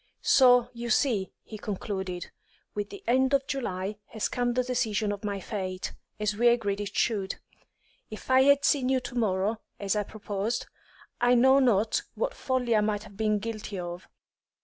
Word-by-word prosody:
"So, 245 -2 +6
you 235 0 -5
see," 220 -5 +2
he 215 - -9
concluded, 190 -4 -4 0.4
"with 205 -1 -3
the 400 - -10
end 260 +3 +3
of 275 -1 +1
July 200 -7 -3
has 220 - -2
come 245 -1 0
the 255 +1 +1
decision 220 -4 0
of 205 0 -5
my 200 -1 -2
fate, 185 -2 -4 0.3
as 210 -1 0
we 240 +3 +3
agreed 205 -4 +2
it 205 0 -6
should. 200 -4 0 0.7
If 215 +4 -7
I 260 0 +7
had 280 +1 +5
seen 260 -3 +3
you 265 -1 +3
to 250 - -7
morrow, 215 -1 0 0.2
as 200 0 0
I 210 - +2
proposed, 210 +2 -3 0.6
I 245 +1 +5
know 265 +3 +6
not 225 -4 +3
what - - -1
folly 255 - 0
I 215 - +4
might 210 0 -1
have 205 -2 -14
been 215 0 +1
guilty 215 -1 -5
of. 175 0 -6
215 Hz, 175 wpm, -28 LUFS, 200-245 Hz, 0.7 s, I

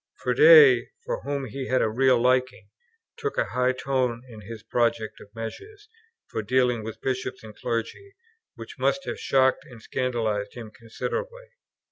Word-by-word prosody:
Froude, 450 -3 +6 0.2
for - - -3
whom 140 -1 -3
he 130 +3 -6
had 130 0 +2
a - - +2
real 125 +3 +3
liking, 130 +1 +1 0.5
took 435 -2 -4
a - - +2
high 125 0 +2
tone 130 -2 -1
in 110 -2 -11
his 110 +1 -9
project 115 -1 -1
of 100 - -14
measures 410 - -8 0.4
for - - -4
dealing 125 +1 +1
with 110 0 -7
bishops 130 -1 -3
and 110 -1 -11
clergy, 115 - -4 0.4
which - - -11
must 275 - 0
have - - -5
shocked 130 -1 +2
and 120 -3 -13
scandalized 110 -4 -2
him 115 -3 -9
considerably. 480 - -6
125 Hz, 155 wpm, -25 LUFS, 115-140 Hz, 0.5 s, Froude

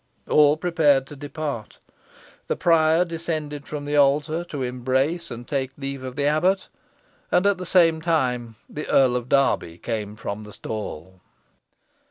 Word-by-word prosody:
All 150 0 +5
prepared 155 -6 +3
to 145 - -11
depart. 145 -5 -5 0.7
The - - 0
prior 165 0 +4
descended 155 -4 -4
from 145 -1 -5
the 145 0 0
altar 145 +4 +3
to 145 -6 -4
embrace 130 +7 -1
and 120 0 -8
take 135 -2 -1
leave 135 -1 -5
of 130 -1 -6
the 140 - 0
abbot; 175 +6 +2 0.6
and 180 - +3
at 200 -2 +3
the 185 - -6
same 165 -3 +4
time 125 -8 0
the 150 - -6
Earl 130 -2 +4
of 125 0 -3
Derby 135 -11 +2
came 105 0 -4
from 105 -1 -5
the 105 -1 -11
stall. 95 -4 -7
145 Hz, 155 wpm, -24 LUFS, 125-160 Hz, 0.7 s, All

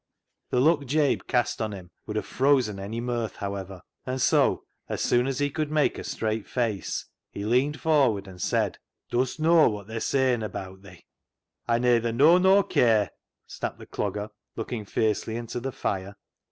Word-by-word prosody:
The 125 - +1
look 145 0 +3
Jabe 145 +1 +2
cast 120 -1 0
on 110 -1 -2
him 90 -2 -10 0.2
would 105 - -4
have 110 - -1
frozen 130 -7 +2
any 105 +4 -4
mirth, 120 -3 -2
however, 100 -2 -6 0.2
and 130 +1 -3
so, - - +3 0.3
as - - -3
soon 120 +1 +2
as 135 -2 -2
he 145 0 0
could 155 +1 -2
make 150 -1 +1
a - - -6
straight 110 -1 -2
face, 115 -6 -2 0.2
he 100 - -6
leaned 130 +7 +1
for 150 -5 +4
ward 100 -3 -4
and 90 -2 -10
said - - 0
— - - -61
" - - -39
Dust 125 +4 0
knaw 165 0 +5
wot 105 -2 -5
they're 110 +2 -5
sayin' 130 -1 +1
abaat 95 -3 -6
thi? 95 -3 -15 0.2
" - - -61
" - - -30
Aw 115 - +4
nayther 120 -1 +2
knaw 150 +9 +6
nor 190 +2 +5
care," 110 - +3 0.3
snapped - - -5
the - - -11
Clogger, 105 +1 -3 0.3
looking 115 -1 -4
fiercely 110 +2 0
into 120 +1 -4
the 135 +2 -4
fire. 100 -3 -3
120 Hz, 195 wpm, -26 LUFS, 105-135 Hz, 0.3 s, knaw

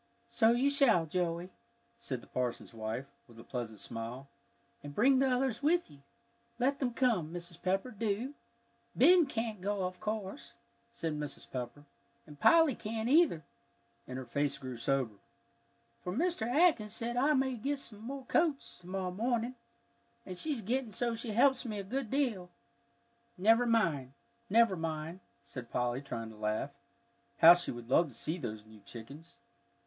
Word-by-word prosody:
"So 235 -1 +4
you 250 +4 +3
shall, 240 - +4
Joey," 175 +2 -2 0.5
said 130 - -4
the - - -15
parson's 125 -1 -3
wife, 110 +3 -4 0.2
with 115 -2 -17
a - - -10
pleasant 115 -4 -5
smile, 115 +5 -6 0.5
"and 145 0 -9
bring 260 +4 +5
the 270 0 +3
others 250 -1 0
with 340 - +2
you. 140 -1 -16 0.6
Let 270 +3 +1
them 245 -3 -1
come, 220 -12 +1
Mrs. 175 0 -8
Pepper, 195 +6 0
do." 225 +4 -2 0.6
"Ben 350 -3 +6
can't 225 -6 -3
go, 200 0 -1
of 180 0 -5
course," 215 -2 -5 0.4
said 165 -9 -3
Mrs. 150 -1 -6
Pepper, 125 +3 -5 0.4
"and 150 -2 -13
Polly 325 - +6
can't, 220 +1 -3
either," 290 - +4 0.6
and 125 - -5
her 130 - -5
face 140 +3 -1
grew 130 -2 -6
sober, 120 -1 0 0.9
"for 180 - -3
Mr. 315 - 0
Atkins 250 -8 +3
says 235 +1 -3
I 280 +5 +3
may 265 0 +1
get 275 +5 -2
some 220 -6 -8
more 265 +3 -6
coats 310 0 0
to 175 - -16
morrow 185 -1 -2
morning, 235 +4 -1 0.7
and 185 - -6
she's 270 - -3
getting 245 +2 -1
so 235 +4 -1
she 230 +1 -4
helps 255 +4 +4
me 220 -4 -4
a 200 - -3
good 245 +4 -3
deal." 230 -10 0 0.9
"Never 225 +6 +4
mind," 165 - +1 1.3
said 125 -3 -8
Polly, 125 +1 -1
trying 115 -5 -6
to - - -13
laugh. 110 +6 -2 0.7
How 165 +1 +10
she 175 0 -2
would 120 0 -7
love 165 +4 +5
to 125 - -14
see 160 +4 -3
those 110 -7 -6
new 110 0 -15
chickens! 140 +10 -11
200 Hz, 160 wpm, -32 LUFS, -, 1.3 s, How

